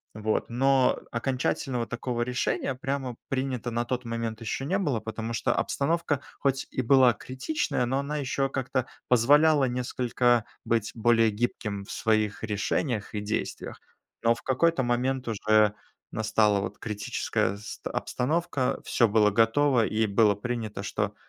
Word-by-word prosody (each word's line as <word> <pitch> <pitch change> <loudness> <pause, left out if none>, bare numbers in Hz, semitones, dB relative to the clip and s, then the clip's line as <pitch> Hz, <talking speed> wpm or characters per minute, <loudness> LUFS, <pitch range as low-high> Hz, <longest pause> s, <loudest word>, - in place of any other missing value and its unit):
Вот. 110 0 -1
Но 135 +2 +3
окончательного 125 0 -1
такого 120 0 -3
решения 125 +2 -1
прямо 135 -2 -3
принято 130 -3 -2
на 120 +1 0
тот 125 0 -3
момент 115 -1 -4
ещё 115 +4 -3
не 190 +6 +1
было, 145 - 0
потому 115 +1 -5
что - - +1
обстановка 145 -1 0 0.2
хоть 135 -1 0
и 130 - -2
была 130 -1 +6
критичная, 130 - -2
но 130 - 0
она 140 +2 -2
ещё 135 0 0
как-то 130 -2 -2 0.2
позволяла 145 +5 +5
несколько 125 -1 +1 0.2
быть 115 -2 0
более 115 -1 +3
гибким 105 -2 -3
в - - -10
своих 110 -1 0
решениях 105 +2 -2
и 105 - -2
действиях. 105 +2 -4 0.4
Но 115 0 +3
в - - -14
какой-то 135 +2 +2
момент 125 +1 0
уже 110 -1 +3 0.4
настала 105 -2 +2
вот 100 +1 -5
критическая 105 -2 -2
ст 105 - -7
обстановка, 150 0 -1
всё 120 - +3
было 105 -1 +4
готово 115 +3 +3
и 110 +1 +1
было 105 0 +3
принято, 110 -2 -4
что 105 0 -2
120 Hz, 145 wpm, -27 LUFS, 110-135 Hz, 0.4 s, была